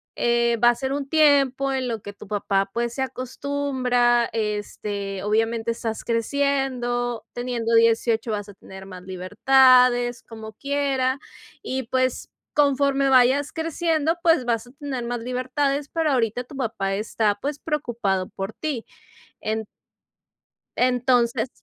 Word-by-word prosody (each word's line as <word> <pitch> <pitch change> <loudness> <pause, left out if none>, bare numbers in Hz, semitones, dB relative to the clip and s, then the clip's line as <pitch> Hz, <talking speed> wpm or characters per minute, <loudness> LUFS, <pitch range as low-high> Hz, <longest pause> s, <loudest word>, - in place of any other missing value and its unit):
eh, 235 0 +2
va 240 - +8
a 240 - +2
ser 265 +2 -3
un 280 -1 -3
tiempo 275 -3 +3
en 260 -1 -1
lo 225 -3 -3
que 205 - -8
tu 205 - -13
papá, 195 -1 0
pues, 235 0 -2
se 265 - -1
acostumbra, 255 -2 0
este, 205 -2 -3
obviamente, 225 +2 0
estás 225 -1 -4
creciendo, 245 -1 -1
teniendo 240 -2 -1
18 230 0 +3
vas 205 -1 -4
a 200 - -12
tener 190 0 -12
más 185 -1 -10
libertades, 245 +6 +4
como 220 -1 -10
quiera, 275 0 -1 0.4
y, 265 0 -3
pues, 255 +1 -1 0.3
conforme 275 -1 +3
vayas 265 +3 +4
creciendo, 325 0 0
pues 325 -7 +4
vas 230 0 -1
a - - -15
tener 275 -3 -5
más 240 0 -3
libertades, 255 +4 -1
pero 325 -2 0
ahorita 245 0 0
tu 280 - -12
papá 220 -7 -2
está, 210 0 0
pues, 290 +1 -3
preocupado 230 - -2
por 195 +3 -6
ti”. 290 -7 -4 0.6
En 220 0 -2 1.1
entonces 245 -1 +2
245 Hz, 135 wpm, -23 LUFS, 225-270 Hz, 1.1 s, va